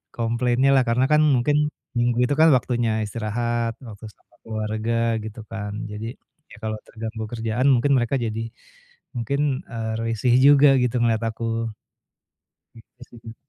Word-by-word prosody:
komplainnya 120 +3 +1
lah, 130 - +4
karena 120 +3 +2
kan 150 0 +5
mungkin 150 +4 +1 0.3
Minggu 120 0 +1
itu 145 - 0
kan 160 - +7
waktunya 120 -2 0
istirahat, 115 +2 -2
waktu 105 0 -10
sama 105 - -32
keluarga 110 +1 -1
gitu 110 +1 -8
kan. 105 -2 -5 0.2
Jadi, 110 +4 -6 0.4
ya - - -12
kalau 110 0 -2
terganggu 110 0 -6
kerjaan 115 +3 -1
mungkin 130 +3 +2
mereka 120 +2 0
jadi 115 -1 -3 0.7
mungkin, 140 +3 -1
eee, 110 -1 -4
risih 115 +2 +1
juga 140 0 +6
gitu 125 -1 0
ngelihat 115 -1 +1
aku. 115 0 -2 1.1
Gitu 115 +2 -19
sih 120 - -14
Kak. 115 0 -10
115 Hz, 145 wpm, -23 LUFS, 110-125 Hz, 1.1 s, kan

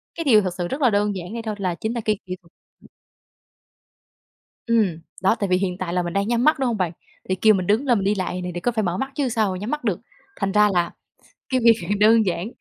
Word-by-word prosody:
cái 330 - -3
điều 225 -7 +5
thực 185 -3 -3
sự 175 -1 -3
rất 275 - -4
là 250 - +5
đơn 205 -1 +1
giản 180 +2 -7
vậy 230 - -4
thôi 215 -2 -3
là 185 -3 -1
chính 220 +6 -3
là 235 - -3
cái 215 -2 +1
kỹ 185 0 -5
thuật 170 - -24 2.2
Ừm, 215 -8 +1 0.2
đó, 195 +3 +4
tại 200 - 0
vì 180 - +3
hiện 185 -1 -2
tại 175 -2 -4
là 180 - +1
mình 175 0 -4
đang 200 +2 0
nhắm 240 0 +1
mắt, 305 0 +4
đúng 265 - 0
hông 235 -3 0
bạn? 180 -4 -1 0.4
Thì 185 - +1
kêu 215 +3 +4
mình 185 -2 -1
đứng 215 +8 +2
lên 240 -5 +3
mình 195 - -2
đi 205 - +2
lại 185 -2 -3
này 180 0 -4
thì 175 - -4
có 245 - 0
phải 220 -2 0
mở 175 0 -1
mắt 270 +4 -3
chứ 275 -3 0
sao 220 -3 +1
mà 185 - -5
nhắm 210 +5 -5
mắt 300 0 -3
được. - - -1 0.4
Thành 195 -1 0
ra 210 0 +5
là 175 -2 +1 0.6
cái 260 -1 +1
việc 230 -1 +8 0.3
đơn 220 +1 +5
giản, 180 +1 -2
205 Hz, 270 wpm, -22 LUFS, 185-230 Hz, 2.2 s, việc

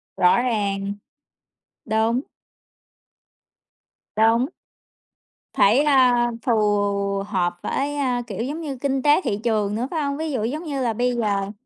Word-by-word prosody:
Rõ 180 +7 +4
ràng. 200 -4 -1 0.9
Đúng. 225 +3 +1 1.9
Đúng. 225 +3 +3 1.1
Phải, 220 +7 +4
a, 255 -4 +4 0.2
phù 240 - +2 0.7
hợp 175 -4 -1
với, 285 +1 -2
a, 250 -3 0
kiểu 230 - -4
giống 300 +6 -4
như 280 -4 -5
kinh 270 0 -1
tế 295 +5 +4
thị 200 - -1
trường 210 -3 0
nữa, 245 +3 -2
phải 320 -3 -1
hông? 280 0 -2
Ví 315 0 -3
dụ 245 -6 -2
giống 295 +8 -3
như 285 -5 -3
là 235 -3 0
bây 245 +2 0
giờ 200 -3 -1
245 Hz, 140 wpm, -22 LUFS, 215-275 Hz, 1.9 s, Rõ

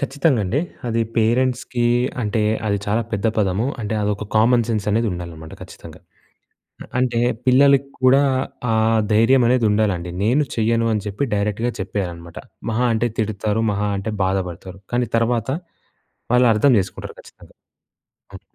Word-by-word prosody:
ఖచ్చితంగండి. 135 - 0 0.3
అది 115 -1 0 0.2
పేరెంట్స్‌కీ 120 +1 +1 0.4
అంటే, 110 +1 -1 0.3
అది 100 -1 0
చాలా 110 +3 +1
పెద్ద 105 +1 -1
పదము. 100 +2 +1
అంటే, 110 0 -3
అదొక 105 0 -2
కామన్ 120 +2 +4
సెన్సనేది 110 +1 0
ఉండాలనమాట 85 -3 -8
ఖచ్చితంగా. - - -12 0.8
అ - - -11
అంటే, 125 -2 0 0.3
పిల్లలకి 140 +1 +4
కూడా 130 +2 +6 0.5
ఆ - - +2 0.4
ధైర్యమనేదుండాలండి. 110 -6 +2
నేను 125 +8 +3
చెయ్యను 115 0 +1
అని 105 -2 -2
చెప్పి 105 +7 -2
డైరెక్ట్‌గా 105 +4 -1
చెప్పేయాలనమాట. 90 -4 -5 0.3
మహా 120 +3 0
అంటే 120 +2 0
తిడతారు, 110 0 -1
మహా 105 0 -1
అంటే 105 +3 -4
బాధపడతారు, 95 -1 -3
కానీ 120 0 +1
తర్వాత 115 0 0 0.8
వాళ్ళు 125 0 +5
అర్థం 110 +6 +3
జేసుకుంటారు 95 -1 -5
ఖచ్చితంగా. - - -18 0.8
హ్మ్. - - -10
110 Hz, 125 wpm, -20 LUFS, 100-120 Hz, 0.8 s, కూడా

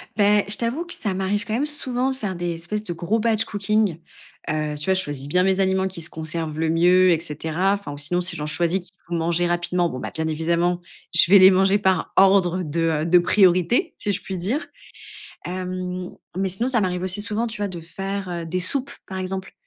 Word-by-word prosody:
Beh, 205 -1 +3
je 205 - +2
t'avoue 240 +8 -2
que 345 - -4
ça 205 -4 -3
m'arrive 195 +3 -1
quand 215 - -4
même 260 +6 0
souvent 265 -4 -1
de - - -4
faire 205 -7 -4
des 175 0 -3
espèces 175 +6 -4
de 175 - -4
gros 175 +7 -1
batch 220 0 +1
cooking. 205 -3 0 0.5
Heu, 155 -1 -2
tu - - -5
vois, 190 - +3
je 190 - +2
choisis 145 -5 -4
bien 180 +5 +2
mes 190 0 +2
aliments 190 0 +1
qui 175 -2 -8
se 165 - -1
conservent 160 -1 -4
le 160 0 0
mieux 180 +3 +4
et 165 - +2
cetera. 160 +4 -1
Enfin, 200 -8 -5
sinon, 175 +5 0
si 180 - 0
j'en 150 - -4
choisis, 170 +4 0
qu'il 180 +1 -14
faut 175 - -6
manger 170 +1 0
rapidement, 175 0 0
bon, 130 - -6
bah, - - -6
bien 160 0 -2
évidemment, 170 +3 0 0.3
je - - +8
vais 200 - +10
les 190 +1 +8
manger 195 +2 +3
par 190 -2 0
ordre 190 -2 +4
de, 160 +1 -3 0.2
heu, - - -2
de 175 +2 +5
priorité, 185 - +3
si 205 - -2
je 190 - -3
puis 190 - -5
dire. 225 - -2 0.8
Hem, 185 0 -4 0.3
mais 190 0 0
sinon, 190 +7 -2
ça 250 -4 +3
m'arrive 180 -2 -1
aussi 190 +2 +1
souvent 220 +2 -2
de 205 -6 -4
faire, 195 +3 -5
heu, 170 -1 -4
des 180 +3 -2
soupes. 270 +9 +2 0.2
Par 190 - -6
exemple, 190 +1 -5
185 Hz, 225 wpm, -22 LUFS, 170-205 Hz, 0.8 s, vais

